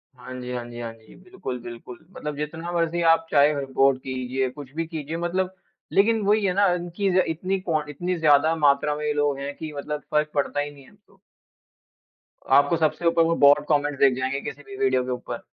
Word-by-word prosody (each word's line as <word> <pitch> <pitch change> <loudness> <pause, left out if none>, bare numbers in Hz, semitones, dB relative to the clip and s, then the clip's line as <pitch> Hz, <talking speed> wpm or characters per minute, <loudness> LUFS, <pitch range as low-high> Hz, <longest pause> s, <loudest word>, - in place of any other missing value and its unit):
हाँ 130 0 -10
जी, 125 0 -6
हाँ 120 -1 -3
जी, 120 0 -9
हाँ 115 -1 -5
जी। 110 -1 -19
बिल्कुल, 185 -9 -7
बिल्कुल। 120 +1 -9
मतलब 150 -5 -6
जितना 165 +3 -5
मर्ज़ी 170 0 0
आप 165 0 -1
चाहे 145 +1 +5
रिपोर्ट 135 0 +2
कीजिए, 130 0 -2
कुछ 135 0 -11
भी 165 0 -1
कीजिए 160 0 -5
मतलब 185 +2 -2 0.4
लेकिन 220 +2 +3
वही 205 +1 +2
है 180 - +1
ना 200 +1 +4
इनकी 175 +3 -2
ज़ - - +3
इतनी 185 +4 -2
कॉन 155 -5 -2
इतनी 175 +5 -2
ज़्यादा 155 +1 +4
मात्रा 145 -1 +2
में 150 0 -4
ये 150 - +1
लोग 145 -1 +1
हैं 140 +1 -4
कि 155 -1 -7
मतलब 150 +1 -4
फ़र्क 150 0 +2
पड़ता 145 0 -1
ही 145 0 -2
नहीं 140 -1 -15
है - - -18
अब 205 - -23
तो। 195 -1 -26 1.4
आपको 145 +4 +3
सबसे 160 +2 0
ऊपर 165 0 +4
वो 165 0 +1
बॉट 145 +1 +6
कमेंट्स 145 -1 +1
दिख 135 -2 +5
जाएँगे 130 +2 -2
किसी 145 - -7
भी 200 - -10
वीडियो 130 -1 +2
के 130 - -3
ऊपर। 120 -1 -5
150 Hz, 215 wpm, -24 LUFS, 135-170 Hz, 1.4 s, बॉट